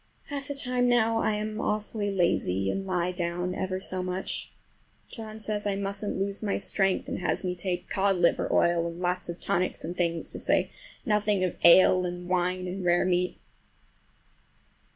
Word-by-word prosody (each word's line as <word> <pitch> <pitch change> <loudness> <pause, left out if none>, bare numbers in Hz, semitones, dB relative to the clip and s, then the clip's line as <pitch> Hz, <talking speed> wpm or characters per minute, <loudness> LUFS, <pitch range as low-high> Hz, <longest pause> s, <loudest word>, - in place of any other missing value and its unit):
Half 280 -1 -4
the 285 - -4
time 250 -2 +1
now 225 -2 +3
I 215 - +1
am 215 +1 -3
awfully 210 0 -2
lazy, 95 - +1
and 195 0 -4
lie 180 -1 0
down 175 0 -2
ever 185 0 -2
so 185 -1 -1
much. 180 +1 -3 0.6
John 220 -2 -8
says 210 -1 -2
I 200 - 0
musn't 200 +1 -3
lose 200 +1 -2
my 205 -2 0
strength, 195 -1 +1
and - - -3
has 180 - -1
me 180 -1 -1
take 180 0 -3
cod 195 0 +1
liver 170 -1 +2
oil 170 -1 +3
and 170 +1 -7
lots 180 0 -1
of 170 - -5
tonics 180 +1 -1
and 175 +2 -5
things, 170 -2 -1
to - - -4
say - - +2 0.3
nothing 210 -3 +2
of 180 - -1
ale 185 +1 +7
and 175 0 -6
wine 180 0 0
and 185 +1 -4
rare 175 +1 +3
meat. 180 0 0
185 Hz, 175 wpm, -28 LUFS, 180-210 Hz, 0.6 s, ale